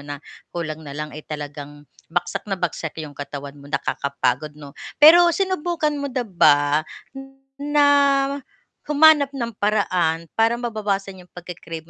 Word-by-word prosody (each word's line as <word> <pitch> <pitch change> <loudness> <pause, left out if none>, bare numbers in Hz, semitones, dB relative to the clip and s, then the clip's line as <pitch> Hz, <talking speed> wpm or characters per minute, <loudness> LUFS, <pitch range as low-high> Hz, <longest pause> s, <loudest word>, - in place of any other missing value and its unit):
na 145 0 -7 0.3
kulang 160 -2 -5
na 145 -2 -9
lang, 150 0 -5
eh, 155 - -8
talagang 145 -1 -8 0.2
bagsak 170 - -3
na 195 - -1
bagsak 165 -3 -4
'yong 150 - -10
katawan 140 0 -7
mo 140 - -13
nakakapagod, 145 +1 -2
'no. 145 -2 -11 0.2
Pero 340 +4 +8
sinubukan 345 -4 -1
mo 285 -1 -4
na 255 -2 -3
ba 150 -6 +3 0.7
na 290 0 +3 1.0
humanap 300 -2 +5
ng 235 -4 -3
paraan 180 -6 0
para 225 +1 +4
mababawasan 210 -5 -3
yung - - -47
pagke-crave 170 -2 -8
175 Hz, 135 wpm, -22 LUFS, -, 1.0 s, Pero